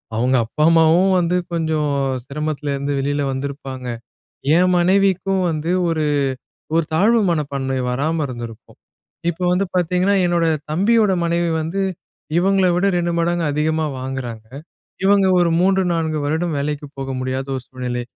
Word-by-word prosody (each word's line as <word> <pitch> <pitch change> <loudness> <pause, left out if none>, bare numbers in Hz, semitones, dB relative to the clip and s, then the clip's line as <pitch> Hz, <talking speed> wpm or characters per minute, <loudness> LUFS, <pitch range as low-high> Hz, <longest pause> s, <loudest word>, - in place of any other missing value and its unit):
அவங்க 125 +4 +2
அப்பா 150 +7 -2
அம்மாவும் 165 +3 +4
வந்து 175 0 +1 0.2
கொஞ்சம் 160 -2 0 0.4
சிரமத்துல 150 0 -3
இருந்து 140 +1 -2
வெளியில 145 +1 -1
வந்திருப்பாங்க, 135 -1 -5 0.7
என் 180 +1 +3
மனைவிக்கும் 190 +1 +2
வந்து 160 +1 -2 0.2
ஒரு, 160 -2 0 0.7
ஒரு 165 0 +3
தாழ்வு 220 +8 +4
மனப்பான்மை 140 -4 -2
வராம 155 +6 -1
இருந்திருக்கும். 120 -3 -9 0.5
இப்போ 175 +2 -8
வந்து 185 +2 +1
பார்த்தீங்கன்னா, 180 +3 +2
என்னோட 170 -1 +1 0.3
தம்பியோட 210 +4 +3
மனைவி 170 0 0
வந்து, 170 +5 -3 0.6
இவங்கள 190 +1 +3
விட 180 +3 +2
2 175 0 -1
மடங்கு 170 0 0
அதிகமா 155 +1 0
வாங்குறாங்க, 125 -4 -5 0.6
இவங்க 200 0 +4
ஒரு 175 -1 +3
3 190 +1 +3
4 160 -2 -1
வருடம் 160 +2 -1
வேலைக்கு 145 +1 -3
போக 135 0 -4
முடியாத 130 +1 -3
ஒரு 130 - -6
சூழ்நிலை, 125 -1 -4
160 Hz, 135 wpm, -20 LUFS, 140-180 Hz, 0.7 s, அம்மாவும்